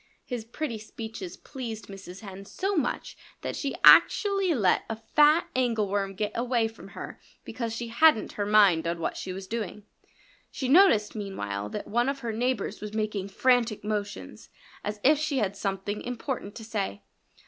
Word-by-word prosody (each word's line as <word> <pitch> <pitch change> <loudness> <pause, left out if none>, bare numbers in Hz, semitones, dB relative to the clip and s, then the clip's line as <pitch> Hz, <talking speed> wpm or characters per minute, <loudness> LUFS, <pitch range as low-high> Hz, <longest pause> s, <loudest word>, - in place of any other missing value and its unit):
His 240 -4 -5
pretty 235 -1 -4
speeches 215 -4 -8
pleased 225 -5 -7
Mrs. 195 -1 -10
Hen 195 -2 -9
so 390 - -2
much 300 -7 -2 0.3
that - - -4
she 280 - -3
actually 395 -3 +6
let 210 - +3
a 225 - -2
fat 295 +9 +4
angleworm 205 -6 0
get 210 +2 -2
away 235 -1 +1
from 225 -3 -12
her - - -7 0.3
because 230 -3 -4
she 235 0 -5
hadn't 305 -1 +4
her 205 - -3
mind 200 -6 +5
on 170 0 -1
what 165 - -2
she 185 - -5
was 190 +1 -6
doing. 210 -1 -5 0.7
She 260 - -4
noticed 260 - +5
meanwhile 105 - -4
that - - -5
one 240 +4 +1
of 275 0 -3
her 230 -2 -3
neighbors 230 -3 -1
was 210 0 -6
making 210 -3 -2
frantic 235 +1 +2
motions, 205 -1 -4 0.3
as 210 0 -4
if 290 +2 +5
she 305 -2 -1
had 200 -4 0
something 195 +1 -3
important 245 -3 -4
to 225 - -8
say. 200 - -3
220 Hz, 170 wpm, -27 LUFS, 200-250 Hz, 0.7 s, actually